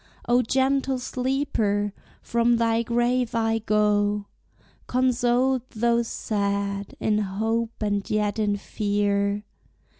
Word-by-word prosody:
Oh 245 +1 +4
gentle 265 +2 +1
sleeper, 250 -6 -1 0.3
from 235 0 +2
thy 230 0 +2
grave 240 +1 0
I 225 0 +1
go 210 -1 +1 0.6
Consoled 255 0 +2
though 235 +1 +1
sad, 200 -3 -2
in 210 -1 +1
hope 225 +3 -2
and 205 -1 -1
yet 210 0 0
in 205 -1 +1
fear. 205 0 0
225 Hz, 100 wpm, -25 LUFS, 205-240 Hz, 0.6 s, Oh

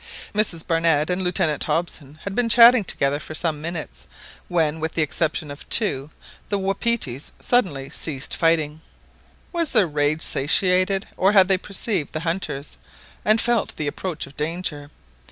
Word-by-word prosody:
Mrs 205 -6 0
Barnett 165 -1 +1
and 180 +1 -1
Lieutenant 170 -4 0
Hobson 155 -4 -2
had 200 - -5
been 235 +2 0
chatting 235 0 +7
together 140 -5 -1
for 155 - -8
some 155 -2 -1
minutes, 155 - -7 0.4
when, 160 -3 0
with 160 +1 -3
the 160 - +1
exception 155 0 -2
of 145 - -11
two, 145 - +2 0.4
the 205 - 0
wapitis 195 - -2
suddenly 175 - +1
ceased 140 -4 -3
fighting. 160 -2 +1 0.7
Was 335 -3 +2
their 215 -5 +5
rage 150 +1 0
satiated? 185 +6 +3
or 195 +2 +3
had 190 -3 +6
they 190 - +4
perceived 195 -4 -2
the 155 - -3
hunters, 165 -4 -4 0.5
and 215 +1 +4
felt 235 -3 0
the 155 - -4
approach 160 +3 -4
of 140 - -16
danger? 150 -2 -4
165 Hz, 155 wpm, -22 LUFS, 150-195 Hz, 0.7 s, chatting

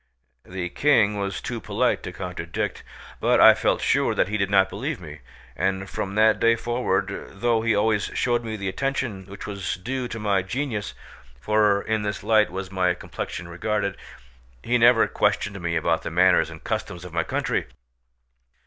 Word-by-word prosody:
The 90 -1 -5
King 105 -4 +3
was 100 -1 -3
too - - -5
polite - - 0
to - - -6
contradict, - - -4 0.4
but - - +3
I - - +9
felt - - 0
sure - - +2
that - - +1
he 105 - -1
did 100 -1 0
not 95 -1 +4
believe 130 +10 -4
me, 75 -3 -10 0.4
and 95 +3 -1
from 95 +1 -4
that 110 0 +4
day 115 0 +4
forward 120 -4 -1 0.2
though 115 +3 0
he 115 -1 +2
always 105 0 +2
showed 120 -1 +1
me 110 -1 -4
the 100 -1 -4
attention 115 -4 -2
which 100 0 -9
was 100 -5 -3
due 125 +8 -4
to 120 - -6
my 100 -3 +1
genius 110 +1 -3 0.4
(for 105 +6 +2
in 110 -1 -1
this 105 -1 -3
light 110 -1 +4
was 95 0 -5
my 90 -2 +1
complexion 85 -1 -6
regarded), 100 +4 -2 0.7
he 120 +1 +1
never 120 0 +6
questioned 100 -3 0
me 85 -1 -1
about 80 0 +1
the - - -4
manners 90 -1 +4
and 80 -1 -11
customs 90 0 -4
of 90 - -10
my 85 -1 +1
country. - - -1
100 Hz, 175 wpm, -24 LUFS, 95-115 Hz, 0.7 s, I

